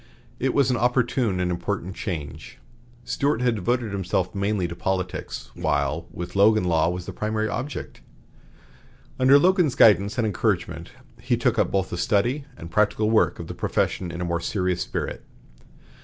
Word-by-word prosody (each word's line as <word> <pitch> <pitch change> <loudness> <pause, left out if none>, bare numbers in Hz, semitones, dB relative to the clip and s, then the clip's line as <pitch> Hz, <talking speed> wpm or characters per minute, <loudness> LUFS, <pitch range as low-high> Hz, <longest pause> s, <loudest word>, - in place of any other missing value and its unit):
It 130 0 0
was 140 -2 +3
an 125 - +1
opportune 120 -4 +1
and 90 -1 0
important 95 +1 -3
change. 75 - -6 0.5
Stuart 140 -2 0
had 125 -1 +3
devoted 115 +2 -1
himself 95 -2 -1
mainly 100 -2 0
to 85 - -7
politics, 95 0 -3
while 75 +4 -1
with 85 +2 -7
Logan 105 +1 +5
law 85 -2 +2
was 90 0 -4
the - - -7
primary 110 0 -1
object. 130 +7 -5 1.2
Under 130 +2 +7
Logan's 175 -3 +3
guidance 105 -3 +5
and 120 - +1
encouragement, 105 -4 -1 0.3
he - - +1
took - - +1
up - - +2
both 95 -2 -1
the 85 - -3
study 120 +9 +1
and 85 - -9
practical 105 +1 +2
work 110 - +3
of - - -6
the - - -7
profession 90 - -1
in 85 +1 -6
a - - -1
more 85 0 -1
serious 90 -2 -1
spirit. - - -4
100 Hz, 165 wpm, -24 LUFS, 90-120 Hz, 1.2 s, Under